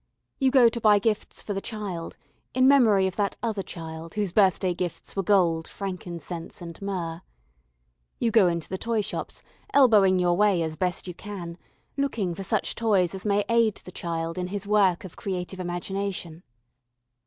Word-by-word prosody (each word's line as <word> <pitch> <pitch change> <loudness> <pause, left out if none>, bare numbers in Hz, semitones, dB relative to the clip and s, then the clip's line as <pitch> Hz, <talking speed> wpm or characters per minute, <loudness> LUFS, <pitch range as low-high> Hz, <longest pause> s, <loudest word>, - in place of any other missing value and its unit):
You 270 -2 +4
go 255 -3 +6
to 235 0 -1
buy 210 -1 +6
gifts 210 +1 -1
for 205 - -3
the 195 - -3
child, 195 -7 -5 0.4
in 255 0 +5
memory 225 -9 +5
of 190 - -3
that 205 -1 0
Other 220 -4 -1
Child 165 -2 -8
whose 205 -4 -1
birthday 190 -2 +3
gifts 175 -1 -5
were 195 - +1
gold, 175 -4 +2
frankincense, 175 -3 -6
and 170 0 -9
myrrh. 175 -4 -3 1.0
You 230 - 0
go 215 -4 +6
into 170 -2 -2
the 190 - -4
toyshops, 225 -3 -3 0.3
elbowing 210 -9 +6
your 175 -1 +2
way 200 -3 +3
as 160 -1 -3
best 180 +3 -2
you 180 - -5
can, 175 -3 -7 0.4
looking 230 -10 -1
for 170 - -7
such 210 +2 0
toys 200 -6 +2
as 190 +2 -4
may 205 0 +2
aid 230 -3 +3
the 180 - -10
child 165 0 -3
in 180 - -2
his 200 +1 -4
work 200 -4 +3
of 190 - -10
creative 185 -1 -4
imagination. 175 -1 -4
190 Hz, 170 wpm, -26 LUFS, 175-210 Hz, 1.0 s, go